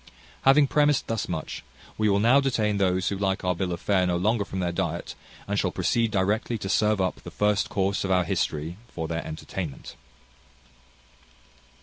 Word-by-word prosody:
Having 140 +2 +6
premised 145 0 +2
thus 115 -2 -3
much, 80 -4 -4 0.3
we 110 -1 +1
will 100 0 +3
now 120 +6 +5
detain 110 -6 0
those 95 -2 +1
who 100 - -3
like 95 -1 0
our 90 - +2
bill 90 +1 -2
of 85 - -3
fare 95 -2 +2
no 90 -1 +1
longer 105 +4 +1
from 95 -1 -5
their 90 -1 0
diet, 85 -1 -3 0.3
and - - 0
shall - - +1
proceed 115 -1 +1
directly 105 +4 0
to 95 -2 -5
serve 105 +1 +2
up 95 -1 0
the - - -10
first 105 -1 +1
course 100 0 0
of 95 - -2
our 90 -1 +3
history 80 +1 -2
for 80 -8 -5
their 85 0 -3
entertainment. 80 -1 -6
95 Hz, 185 wpm, -26 LUFS, 90-110 Hz, 0.3 s, Having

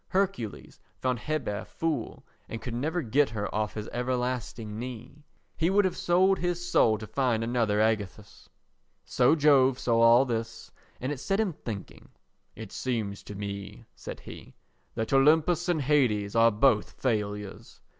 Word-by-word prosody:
Hercules 185 - -2 0.2
found 125 -2 -1
Hebe 120 -6 -3
a - - -8
fool 155 -7 -4 0.2
and 115 - -5
could 120 - -6
never 155 +8 -1
get 135 +4 +2
her 105 -2 -4
off 105 0 -2
his 105 -1 -5
everlasting 125 -3 -3
knee. 130 +4 -8 0.3
He 165 +2 +1
would 200 +1 +3
have 185 - 0
sold 190 +2 +3
his 175 0 -2
soul 110 -10 +3
to 110 - -8
find 120 -2 0
another 115 -3 0
Ægisthus. 105 -2 -2 0.6
So 125 +5 +3
Jove 140 -4 +4
saw 115 -3 +1
all 120 +3 +6
this 115 -2 -4 0.3
and 130 +3 -3
it 145 - -4
set 195 +8 -1
him 210 -6 0
thinking. 110 -8 -8 0.5
"It 110 -3 -9
seems 110 -6 -3
to 105 - -8
me," 100 +2 -7
said - - -8
he, - - -12 0.4
"that 110 +3 -2
Olympus 160 +5 +4
and 160 -5 +1
Hades 120 -8 +1
are 115 0 +6
both 110 0 +2
failures." 105 -4 -3
120 Hz, 155 wpm, -28 LUFS, 110-150 Hz, 0.6 s, all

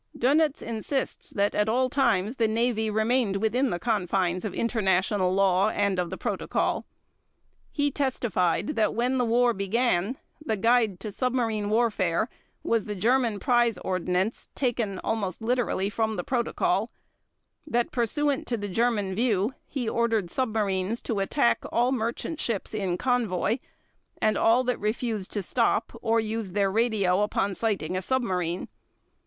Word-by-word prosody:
Dönitz 295 +4 +2
insists 230 +4 -3
that 200 0 0
at 210 +1 +1
all 255 +3 +2
times 245 -4 +1
the 225 - +3
Navy 220 0 +1
remained 220 0 +1
within 230 +6 +1
the 175 - -1
confines 185 -4 0
of 215 - -3
international 190 -4 +1
law 195 +1 +3
and 200 -3 0
of 175 -1 -1
the 190 - -5
Protocol. - - -1 0.8
He 290 -1 0
testified 240 - 0
that 220 -8 +1
when 250 +3 +1
the 245 - +2
war 240 +1 +3
began, 210 +2 0 0.3
the 220 -8 -1
guide 225 -3 +2
to 210 - -5
submarine 230 -3 -1
warfare 215 -3 +1 0.3
was 230 -3 +1
the 210 - -4
German 230 +1 +1
Prize 240 -4 +2
Ordinance 185 +3 -1
taken 230 -7 -1
almost 200 -5 -2
literally 230 -4 0
from 220 +1 -1
the - - -3
Protocol, 240 -2 0 0.8
that 240 -5 0
pursuant 275 +4 0
to 235 - -1
the 205 -1 -4
German 210 -2 0
view, 215 +1 +1
he 260 -5 -3
ordered 225 -6 0
submarines 215 -3 -1
to 220 -4 -2
attack 235 +6 +1
all 245 +2 +2
merchant 245 +6 -2
ships 225 -3 -2
in 190 -4 -1
convoy, 230 -3 0 0.6
and 215 0 +2
all 235 +3 +4
that 250 -1 -1
refused 215 -2 -2
to 205 - -1
stop 230 +2 +1
or 230 0 +2
used 220 -3 -3
their 200 -2 +2
radio 205 -4 +2
upon 200 -1 0
sighting 190 -5 -1
a 185 - -1
submarine. 185 -7 -1
220 Hz, 150 wpm, -26 LUFS, 195-240 Hz, 0.8 s, all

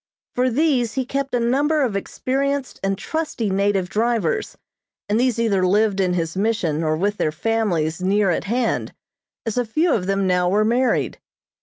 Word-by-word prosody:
For 255 +1 +1
these 255 -4 +1
he 260 -1 -1
kept 275 0 -2
a - - +2
number 285 +6 +2
of 230 -6 -1
experienced 270 +6 -2
and 195 0 0
trusty 300 -9 -3
native 195 -1 +1
drivers, 235 - -1 0.5
and 210 +2 +1
these 250 -2 +1
either 210 -5 +1
lived 200 +2 +2
in 185 -2 +2
his 165 -1 -2
Mission 190 -7 0
or 155 0 0
with 205 +4 0
their 155 - 0
families 175 -4 -1
near 195 +1 +2
at - - -2
hand, 235 +3 -1 0.5
as 225 +2 -1
a - - +2
few 310 +9 +1
of 185 -4 -1
them 195 0 +1
now 180 -1 +2
were 210 +3 +2
married. 245 +3 +1
220 Hz, 175 wpm, -21 LUFS, 190-255 Hz, 0.5 s, a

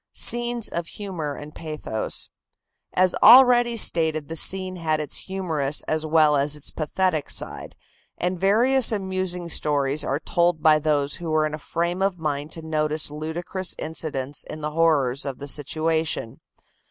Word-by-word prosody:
SCENES 240 -1 +1
OF 170 -1 -4
HUMOR 170 -9 -5
AND 150 +1 -10
PATHOS. 155 -9 -5 0.6
As 185 0 +4
already 245 -2 +7
stated, 160 -6 +1
the 165 - -4
scene 185 +2 +2
had 155 -2 -1
its 150 - -2
humorous 160 -7 -2
as 155 0 -2
well 155 -1 +4
as 145 +1 +1
its 150 - -6
pathetic 160 0 -1
side, - - -6 0.4
and 180 0 -2
various 235 +7 +3
amusing 185 -3 -2
stories 145 -2 0
are 140 0 -2
told 170 -2 0
by 155 -1 +5
those 145 -2 0
who 170 -1 -6
were 155 0 +2
in 155 - -4
a 155 - -5
frame 170 +5 -2
of 195 -2 0
mind 150 -2 -3
to 165 - -8
notice 155 -1 0
ludicrous 165 +4 -4
incidents 145 -4 -4
in 155 - -8
the 150 0 -3
horrors 150 -5 +1
of 135 -3 -4
the 140 - -8
situation. 155 -3 -1
160 Hz, 155 wpm, -23 LUFS, 150-185 Hz, 0.6 s, already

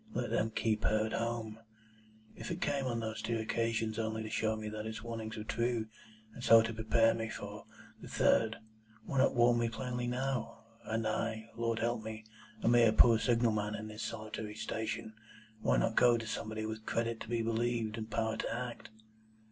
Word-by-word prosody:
Let 120 - -1
them 110 - +1
keep 110 -1 0
her 110 0 +2
at 110 - -4
home'? 115 -2 -2 0.8
If - - -7
it 170 0 -3
came, 140 -5 0
on 115 -2 -1
those 110 -1 -4
two 115 +1 -1
occasions, 115 0 -1
only 110 0 -2
to 110 - -6
show 110 0 +1
me 110 0 -5
that 105 0 -4
its 110 0 -6
warnings 115 -1 -5
were 105 - -4
true, 115 0 -1 0.4
and 125 - -9
so 115 -1 +8
to 115 0 -3
prepare 115 +1 +3
me 115 0 -3
for - - -7 0.4
the - - -9
third, 110 0 +3 0.5
why 135 - -1
not 130 - +4
warn 120 0 +5
me 115 0 +1
plainly 120 +1 -3
now? 130 0 -2 0.2
And 110 0 -1
I, 110 0 -2
Lord 115 -1 0
help 115 0 0
me! 110 0 -7 0.4
A - - +1
mere 120 -1 +6
poor 115 0 +6
signal 120 -1 +3
man 105 0 -1
on 110 0 -6
this 105 +1 -7
solitary 110 -1 -5
station! 110 0 -3 0.5
Why - - +3
not 115 - +1
go 120 -1 +6
to 115 - -5
somebody 110 0 -3
with 110 0 -6
credit 115 0 -1
to 110 - -8
be 115 -1 0
believed, 115 -1 0
and 110 -1 -5
power 110 0 0
to - - -2
act?" 120 +1 -5
115 Hz, 195 wpm, -33 LUFS, 110-115 Hz, 0.8 s, so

